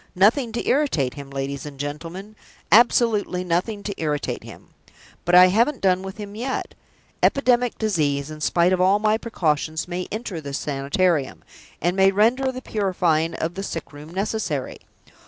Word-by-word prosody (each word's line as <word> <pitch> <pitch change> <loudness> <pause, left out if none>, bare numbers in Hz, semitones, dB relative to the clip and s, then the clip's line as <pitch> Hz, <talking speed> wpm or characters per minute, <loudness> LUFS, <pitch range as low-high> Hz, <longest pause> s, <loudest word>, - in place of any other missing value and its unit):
Nothing 225 +6 +3
to 235 - -3
irritate 250 - +1
him, 140 -1 -9
ladies 135 0 -4
and 145 -2 -9
gentlemen 165 +8 -6 0.4
absolutely 220 -5 +4
nothing 185 +4 -1
to 200 - -3
irritate 150 -2 -2
him! - - -13 0.6
But 175 - +3
I 180 +1 +9
haven't 235 +8 +2
done 185 -1 +2
with 190 +1 -8
him 205 -1 -7
yet. 250 +5 -4 0.5
Epidemic 245 -3 +2
disease, 150 -9 0
in 155 0 -9
spite 175 +4 +3
of 185 - +1
all 190 +2 +4
my 215 +1 +1
precautions, 160 -8 -1
may 180 0 -4
enter 215 -6 -4
this 140 -2 -4
Sanitarium, 145 +2 0 0.4
and 175 +3 0
may 195 0 +5
render 240 +7 +2
the 255 0 -8
purifying 175 -6 0
of 165 +2 -3
the 195 - -5
sick 165 -6 -6
room 145 +2 -11
necessary. 185 - -3
185 Hz, 160 wpm, -23 LUFS, 155-215 Hz, 0.6 s, I